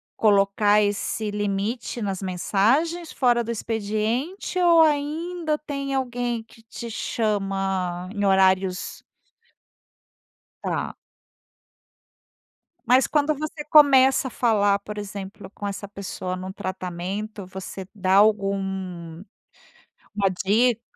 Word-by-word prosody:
colocar 205 0 +4
esse 205 +1 -1
limite 205 +4 -2
nas 195 -2 -3
mensagens, 240 - +1
fora 240 -2 +2
do 230 - -4
expediente 225 - -2
ou 340 -2 +6
ainda 310 +2 0
tem 275 -2 -4
alguém 245 -3 -2
que 225 0 -20
te 230 +1 -8
chama 195 -5 -1
em 205 -1 -2
horários? 190 -1 +2 1.6
Tá. - - -3 1.9
Mas 255 +2 +4
quando 300 0 +1
você 300 +1 -5
começa 270 -3 +6
a - - -10
falar, 205 -4 +2
por 210 +1 -8
exemplo, 195 -1 -7
com 205 0 -7
essa 200 0 -5
pessoa 185 -2 -5
no 185 +1 -6
tratamento. 185 +3 -5
Você 190 0 -8
da 190 -2 +1
algum 195 -4 +1 0.9
uma 200 -2 +2
dica? 230 +3 +3
210 Hz, 105 wpm, -24 LUFS, 195-255 Hz, 1.9 s, ou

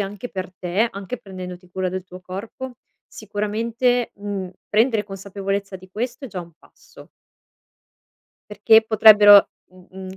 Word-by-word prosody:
anche 205 +4 -5
per 185 -1 -5
te, 185 +6 0
anche 200 +5 -7
prendendoti 180 -2 -10
cura 185 0 -2
del 185 0 -5
tuo 185 0 -12
corpo, 220 +8 -7 0.3
sicuramente, 230 +4 -2
uhm, 200 -2 -5 0.2
prendere 220 0 +2
consapevolezza 195 0 -5
di 185 0 -17
questo 240 +5 -5
è - - -7
già 185 -3 -6
un 170 -1 -12
passo. - - -18 1.4
Perché 220 +2 +5
potrebbero 210 -2 +7 0.2
m 185 -1 -19
uhm, 190 0 -9
200 Hz, 135 wpm, -21 LUFS, 185-220 Hz, 1.4 s, potrebbero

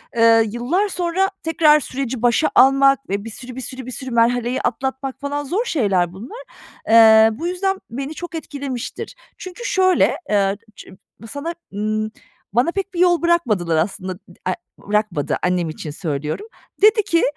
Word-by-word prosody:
eee, 230 -1 +5
yıllar 270 - 0
sonra 370 +1 0
tekrar 310 -2 +4
süreci 260 -3 -4
başa 245 +6 +3
almak 275 +1 +5
ve 200 +1 -2
bir 225 - -5
sürü 250 +2 -9
bir 260 - -6
sürü 260 0 -7
bir 255 - -7
sürü 260 0 -6
merhaleyi 240 +1 +1
atlatmak 265 0 -3
falan, 285 +1 -3
zor 380 - -1
şeyler 195 - +1
bunlar. 260 - -9 0.5
Eee, 220 -1 +8
bu 325 +10 -4
yüzden 385 +2 -1
beni 275 +5 -5
çok 350 0 -7
etkilemiştir. 280 - -6 0.2
Çünkü 370 +7 -9
şöyle, 370 -4 +3
eee, 200 -1 +2 0.2
ç - - -12 0.4
sana 325 +4 -5 0.2
ımm, 215 +1 -2 0.4
bana 245 +9 +2
pek 390 0 -4
bir 345 - -4
yol 355 -1 +4
bırakmadılar 220 - +1
aslında. 185 +2 -2
Dı - - -32 0.3
a - - +1 0.3
bırakmadı, 205 -7 -1
annem 180 -2 0
için 155 -1 -7
söylüyorum. 150 - -4 0.3
Dedi 430 +1 +5
ki, 335 -3 +1
260 Hz, 160 wpm, -20 LUFS, 215-335 Hz, 0.5 s, Eee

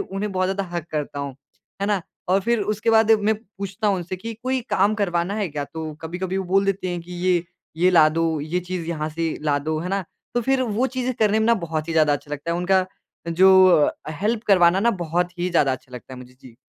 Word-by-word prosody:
उन्हें 200 +2 -4
बहुत 185 0 +1
ज़्यादा 195 +1 -1
हग 170 - -3
करता 150 -2 -3
हूँ, 140 -2 -5 0.5
है 200 - +1
ना? 205 -2 +1 0.3
और 190 +2 +3
फिर 235 +2 +1
उसके 215 +2 0
बाद 225 0 +4
मैं 215 0 +3
पूछता 200 -1 -6
हूँ 200 - +2
उनसे 180 +1 -5
कि 230 +5 -6
कोई 260 0 0
काम 200 +3 +3
करवाना 180 -2 -1
है 210 -4 -1
क्या? 145 -1 -4
तो 160 +1 -7
कभी-कभी 180 +3 -4
वो 190 - -2
बोल 195 +2 +2
देते 195 -1 -1
हैं 175 -1 -3
कि 180 +1 -11
ये 180 -1 +1 0.3
ये 180 +3 +4
ला 160 -4 +6
दो, 160 -1 0
ये 160 +5 -2
चीज़ 180 -2 -5
यहाँ 155 -2 -2
से 165 +1 -2
ला 145 -2 +1
दो, 155 +2 -2
है 175 - -4
ना? 195 0 -1 0.3
तो 240 - +2
फिर 265 +2 +1
वो 235 +2 0
चीज़ें 255 0 -1
करने 215 -1 +2
में 220 - +1
ना 235 - +5
बहुत 165 -5 -4
ही - - -1
ज़्यादा 155 -2 +4
अच्छा 145 +1 -4
लगता 150 +3 -4
है - - -1
उनका 185 +1 +2 0.4
जो 190 +2 +6
अ, 165 -5 +5 0.3
हेल्प 215 +2 0
करवाना 185 -2 +5
ना 235 +3 +3
बहुत 175 +2 -1
ही 180 +1 -1
ज़्यादा 145 -6 +3
अच्छा 130 0 -8
लगता 125 +1 -10
है - - -10
मुझे, 125 0 -13
जी। 125 -3 -15
180 Hz, 245 wpm, -23 LUFS, 160-200 Hz, 0.5 s, ला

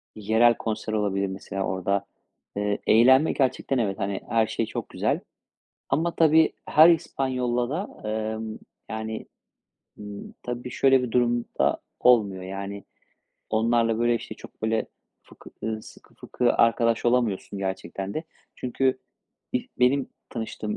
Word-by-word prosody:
yerel 110 +3 +4
konser 110 -1 -3
olabilir 100 -2 0
mesela 95 0 -4
orada. 95 +1 -1 0.5
Eee, 105 0 0
eğlenme 130 +7 +6
gerçekten 135 0 0
evet, 105 -3 -1
hani, 100 -1 -2
her 115 -1 +3
şey 115 - -1
çok - - -5
güzel - - 0 0.7
ama 165 +5 0
tabii, 160 0 +5
her 155 +2 +7
İspanyol'la 125 -7 0
da, 175 +8 -5
emm, 110 0 -3 0.3
yani, 110 0 -4 0.7
ımm, 105 -1 -9
tabii, 125 0 -5
şöyle 135 0 +4
bir 125 - -3
durumda 120 0 +1 0.2
olmuyor, 105 -7 +4
yani. 100 +2 -6 0.7
Onlarla, 115 0 +2
böyle, 120 0 +3
işte, 115 - -5
çok, - - -15
böyle, 110 0 0 0.4
fıkı - - -15
ııı, 110 0 -2
sıkı - - -16
fıkı 125 -1 0
arkadaş 115 0 +3
olamıyorsun 120 -5 +1
gerçekten 95 0 -4
de. 160 - -3 0.3
Çünkü 130 +1 0 0.5
ilk 255 0 -4
benim 130 +2 +3 0.2
tanıştığım 110 -2 -4
115 Hz, 130 wpm, -25 LUFS, 105-125 Hz, 0.7 s, her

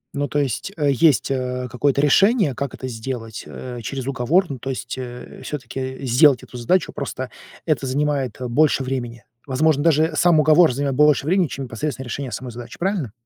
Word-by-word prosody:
Ну, 145 0 -1
то 145 - 0
есть, 140 - -2
э, 145 -2 +2
есть, 145 +1 +3
э, 125 -1 -2
какое-то 140 +3 +1
решение, 195 - +4
как 140 0 -4
это 130 - -6
сделать, 115 -1 -6
э, 125 -1 -7
через 135 +2 -4
уговор, 140 +8 +2
ну, 140 - -4
то 135 - -5
есть, 125 -1 -4
э, 125 -1 -8
всё-таки, 135 -3 -6
э, 130 +1 -5
сделать 130 +1 +5
эту 125 - -10
задачу, 160 +10 +1
просто 130 -2 -5 0.4
это 155 -4 0
занимает, 135 -4 -1
э, 125 - -3
больше 140 +2 +2
времени. 120 -2 -4 0.2
Возможно, 145 +2 +2
даже 160 0 +3
сам 170 -2 +4
уговор 155 +1 +5
занимает 140 +1 -1
больше 150 0 +4
времени, 185 0 +3
чем 135 -1 -5
непосредственно 135 +3 -4
решение 130 +1 -5
самой 125 +4 -5
задачи. 120 +1 -10
Правильно? 180 - -1
135 Hz, 190 wpm, -21 LUFS, 125-150 Hz, 0.4 s, сделать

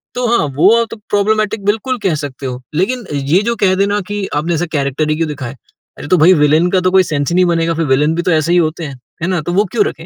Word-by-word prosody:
तो 250 0 -1
हाँ, 150 - 0
वो 180 +9 +5
आप 230 - -2
तो 225 - -7
प्रोब्लेमेटिक 210 0 0
बिल्कुल 220 +5 0
कह 180 -5 +1
सकते 135 0 -8
हो। 125 0 -5
लेकिन 235 +8 -1
ये 145 +6 +1
जो 235 - 0
कह 185 -1 +3
देना 200 +2 0
कि, 205 -1 -3
"आपने 160 +4 -1
ऐसा 170 +2 -1
कैरेक्टर 145 +2 -1
ही 155 - +1
क्यों 165 0 0
दिखाया?" 135 -3 -6 0.4
अरे 145 - -8
तो 180 - +3
भई 175 +4 +6
विलेन 155 +3 +3
का 190 - +3
तो 185 0 +1
कोई 190 0 +5
सेंस 145 -5 -2
ही 175 - -1
नहीं 185 0 +4
बनेगा 165 -1 +1
फिर 165 0 -1
विलेन 145 +4 +2
भी 175 - -1
तो 180 - +1
ऐसे 160 0 +1
ही 180 - +4
होते 160 +1 -1
है। 140 -2 -7 0.3
है - - 0
ना, 185 -3 0
तो 175 +4 -4
वो 200 +3 +2
क्यों 215 -3 +2
रखें? 165 - -6
170 Hz, 280 wpm, -15 LUFS, 150-195 Hz, 0.4 s, भई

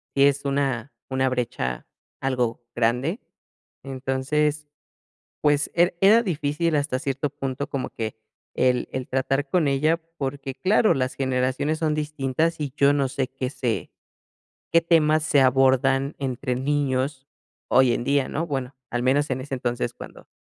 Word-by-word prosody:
si 140 - +5
es 140 0 +3
una 135 -3 -1 0.2
una 130 0 +2
brecha 120 - -2 0.3
algo 125 -3 -1
grande, 125 - +1 0.6
entonces, 140 +3 -1 0.7
pues, 145 -1 +2
era 175 +1 +4
era 215 +4 +6
difícil 155 -1 -1
hasta 140 -3 0
cierto 140 0 -2
punto, 135 +1 -4
como 135 -2 -3
que 110 -1 -5 0.4
el 125 -1 +1
el 130 -1 -3
tratar 135 +2 0
con 165 -4 +2
ella, 155 +4 +2 0.2
porque 135 -1 -4
claro, 210 +3 +3
las 130 -1 -1
generaciones 130 +3 0
son 155 -2 0
distintas, 150 +2 -1
y 140 -3 -3
yo 140 0 +5
no 140 -2 +1
sé, 135 -1 -2
qué 130 -1 -4
sé 120 -5 -2 0.8
qué 165 - +6
temas 155 -2 +3
se 145 -3 +3
abordan 135 +1 +3
entre 130 -1 -2
niños 135 0 -1 0.4
hoy 130 -2 +5
en - - -2
día, 140 -1 +1
¿no? 165 +3 -2
Bueno, 135 -2 -3 0.2
al 120 0 -1
menos 140 +3 +2
en 130 0 -2
ese 135 0 -4
entonces, 120 -1 -2
cuando - - -12
135 Hz, 150 wpm, -24 LUFS, 130-150 Hz, 0.8 s, era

